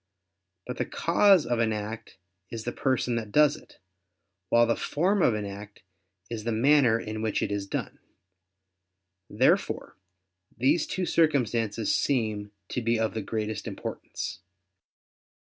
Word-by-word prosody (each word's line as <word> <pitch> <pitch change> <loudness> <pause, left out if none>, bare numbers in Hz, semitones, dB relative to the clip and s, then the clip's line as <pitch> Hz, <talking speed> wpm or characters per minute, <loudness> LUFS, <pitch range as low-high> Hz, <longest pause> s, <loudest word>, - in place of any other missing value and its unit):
But 125 - -6
the - - -1
cause 185 +1 +4
of 120 -1 0
an 115 -1 +2
act 105 0 -6 0.3
is 115 -1 -6
the 120 - -3
person 125 -2 0
that 110 -3 -5
does 150 +2 +5
it; - - -16 0.7
while 120 0 +5
the 115 - +1
form 185 +6 0
of 120 - +4
an 105 -1 -3
act 100 +1 -9 0.4
is 115 -2 -5
the 115 - -1
manner 120 0 +4
in 110 -1 -5
which 110 -2 0
it - - -2
is 100 -1 -2
done. - - -4 1.3
Therefore - - +1 0.6
these 145 +7 +2
two 185 - -2
circumstances 120 -10 +1
seem 110 -6 0 0.2
to 125 - -2
be 115 0 +1
of 110 -1 0
the 110 - -3
greatest 110 +1 -4
importance. - - -6
115 Hz, 145 wpm, -27 LUFS, 110-140 Hz, 1.3 s, does